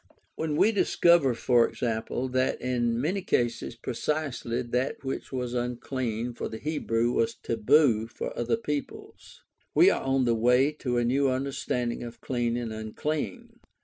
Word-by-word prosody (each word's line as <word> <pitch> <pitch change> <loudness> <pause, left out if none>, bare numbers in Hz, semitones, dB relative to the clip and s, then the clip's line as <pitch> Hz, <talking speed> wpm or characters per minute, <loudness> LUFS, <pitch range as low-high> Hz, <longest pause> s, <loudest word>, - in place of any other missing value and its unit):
When 155 -2 -2
we 215 - +4
discover, 170 - +4
e.g., 120 0 +2
that 125 +3 -1
in 120 -2 0
many 180 +9 0
cases 120 -9 -1
precisely 125 0 -2
that 125 +4 -2
which 135 0 -4
was 125 -2 -3
"unclean" 120 -1 -2
for 120 - -5
the 110 - -6
Hebrew 120 -5 0
was 115 -1 0
"taboo" 115 0 +3
for 120 - -6
other 120 - 0
peoples, 150 -10 -6 0.3
we - - +7
are - - -1
on 135 -1 +1
the 120 - +3
way 125 +5 +3
to 125 -3 -1
a 120 - +2
new 135 +3 +2
understanding 130 -2 -2
of 120 -1 -8
"clean 120 -2 -1
and 115 -2 -4
unclean." 110 +2 -4
125 Hz, 145 wpm, -27 LUFS, 115-135 Hz, 0.3 s, we